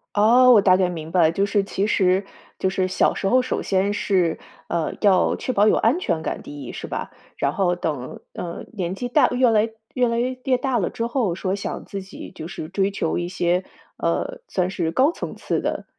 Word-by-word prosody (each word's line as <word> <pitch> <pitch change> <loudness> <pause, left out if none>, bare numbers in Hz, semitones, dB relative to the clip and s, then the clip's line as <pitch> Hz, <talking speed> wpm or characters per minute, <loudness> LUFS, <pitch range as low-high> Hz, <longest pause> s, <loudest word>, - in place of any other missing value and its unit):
哦， 245 +5 +6
我 215 -4 +7
大 185 -2 +5
概 185 -2 +2
明 160 -2 -6
白 180 -1 +3
了。 160 0 +5
就 195 +4 +1
是 205 -1 +1
其 195 0 -2
实 190 -1 +2 0.3
就 190 - +1
是 185 -1 0
小 185 - +2
时 195 - -2
候， 255 +4 +4
首 255 - -2
先 195 +1 +1
是， 180 -6 +1 0.3
呃， 165 -2 -1
要 195 -3 +4
确 255 - -3
保 205 +2 +4
有 - - +5
安 250 +11 +2
全 165 - -1
感 - - -4
第 145 -1 -9
1 120 - -7
是 - - -7
吧？ - - -5 0.3
然 140 +1 0
后 180 -3 +1
等， 150 -7 -4
呃， 170 -1 -6
年 185 -2 -3
纪 245 +4 -4
大 245 - +4
越 250 -1 +3
来 220 0 +3 0.2
越 250 -1 +2
来 230 0 0
越 255 +1 0
大 260 -3 0
了 180 - 0
之 230 -1 -3
后， 235 -9 0
说 190 0 -2
想 205 - -5
自 195 -1 -6
己 190 - -10
就 160 -2 -7
是 160 -3 -6
追 195 +2 0
求 195 -5 -2
一 175 0 -2
些， 180 0 0 0.3
呃， - - -1
算 180 -1 0
是 170 -4 -1
高 270 - +3
层 - - -6
次 - - -2
的， - - -3
195 Hz, 235 characters per minute, -23 LUFS, 175-230 Hz, 0.3 s, 我